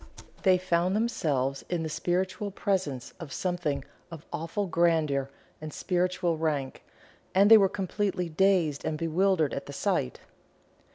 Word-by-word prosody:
They 185 -2 +5
found 180 +1 +1
themselves 140 - 0
in 175 -2 -1
the - - -2
spiritual 185 +5 -1
presence 185 -10 -2
of 165 -5 -8
Something 155 -5 -2 0.2
of 165 -3 -10
awful 165 +6 -2
grandeur 160 -6 +1 0.3
and 155 0 -6
spiritual 180 -1 0
rank, 145 -5 -2 0.5
and 200 +3 +5
were 205 -4 +8
completely 190 -1 -2
dazed 170 -3 +2
and 155 - -2
bewildered 165 -1 +1
at 140 - -5
the 140 - -7
sight. 65 - -1
170 Hz, 130 wpm, -28 LUFS, 150-190 Hz, 0.5 s, were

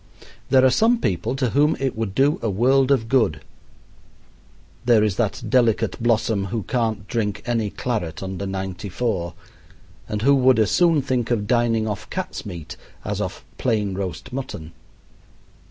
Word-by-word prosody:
There 130 -1 +5
are 130 - +5
some 225 - +3
people 95 - -1
to 130 -4 0
whom 150 +2 +3
it 135 -2 -1
would 110 -3 -3
do 140 +3 +3
a 115 - 0
world 130 +6 +3
of 130 -5 +2
good. 110 - +2 1.4
There 120 -3 +4
is 105 -3 +1
that 120 0 -1
delicate 115 -2 +2
blossom 110 -3 +1
who 105 +2 -3
can't 115 -4 -1
drink 105 -4 -2
any 115 -3 0
claret 95 -9 -3
under 95 +1 -4
ninety 95 0 -4
four, 90 -6 -2 0.7
and 105 0 -3
who 140 +3 +5
would 130 -2 +4
as 110 -2 +2
soon 165 -5 +3
think 125 -3 -1
of 110 -4 0
dining 115 -1 +1
off 105 0 -5
cat's 185 - -5
meat 85 -5 -8 0.3
as - - -2
off - - -5
plain 105 -5 0
roast 95 - -5
mutton. 90 -12 -6
115 Hz, 160 wpm, -22 LUFS, 100-130 Hz, 1.4 s, There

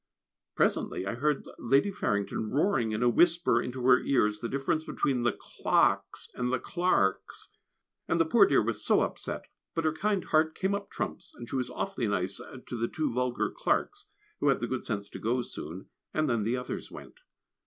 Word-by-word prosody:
Presently 95 - +1
I 100 - -2
heard 145 +4 0
Lady 135 - +3
Farrington 105 - -1
roaring 135 - +1
in 110 +2 -1
a - - +4
whisper 170 +7 +4
into 125 0 -4
her 125 -1 +7
ears 105 -6 +1
the 115 - -4
difference 140 +3 0
between 135 -5 0
the 120 0 +2
Clarkes - - +1
and 125 0 -2
the 130 - +2
Clarks, 130 - 0 0.6
and 165 - +1
the 165 - +4
poor 200 +5 +6
dear 140 - +4
was 115 +1 -2
so - - +4
upset; - - -3 0.3
but 165 - -1
her 155 - +2
kind 200 +2 0
heart 155 0 +2
came 190 +1 0
up 200 0 -3
trumps, - - -5
and 120 - -9
she - - -5
was 130 -2 -1
awfully 195 - -2
nice 95 -1 -1 0.3
to - - -6
the 115 0 -1
two 155 -2 -2
vulgar 125 0 0
Clarks, - - -1 0.3
who - - +1
had - - +4
the - - -1
good - - -3
sense 100 -1 -3
to - - -8
go 120 +3 0
soon, 85 -3 -8 0.3
and 155 0 +2
then 115 -2 +1
the 115 +4 0
others 125 - -5
went. - - -12
125 Hz, 195 wpm, -29 LUFS, 115-160 Hz, 0.6 s, her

